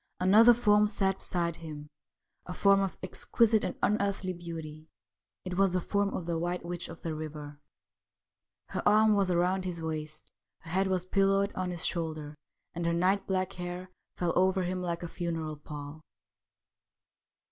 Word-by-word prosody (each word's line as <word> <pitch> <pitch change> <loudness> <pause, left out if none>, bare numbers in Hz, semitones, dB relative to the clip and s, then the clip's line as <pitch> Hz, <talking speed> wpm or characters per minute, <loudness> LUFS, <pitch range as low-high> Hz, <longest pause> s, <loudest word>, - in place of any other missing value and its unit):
Another 220 +6 +7
form 210 -3 +4
sat 195 -2 0
beside 170 -2 -1
him 155 -3 -8 0.3
— - - -51
a 180 - -5
form 200 -1 +5
of 195 -2 -2
exquisite 220 +4 +2
and 185 - -3
unearthly 200 -3 0
beauty. 160 -3 -8 0.6
It 180 -1 -4
was 195 -2 +4
the 185 - +2
form 200 +3 0
of 180 - -4
the 170 -1 -1
White 175 +1 -2
Witch 175 0 -5
of 165 - -11
the 165 - -2
River; 150 -2 -7 1.1
her - - -2
arm 215 +1 +5
was 195 -2 +2
round 180 +2 +1
his 180 -2 -4
waist, 155 -1 -5 0.3
her 165 - -8
head 190 +2 +2
was 185 -1 0
pillowed 195 +1 +2
on 185 -1 -2
his 175 -2 -3
shoulder, 155 -3 -3 0.4
and 170 - -4
her 170 - +1
night 185 +4 +1
black 185 -1 -1
hair 180 +1 -6 0.3
fell 175 -2 0
over 185 +1 +3
him 180 +1 -2
like 170 -1 -3
a - - -3
funeral 165 -3 -3
pall. 150 +1 -9
180 Hz, 170 wpm, -30 LUFS, 165-195 Hz, 1.1 s, Another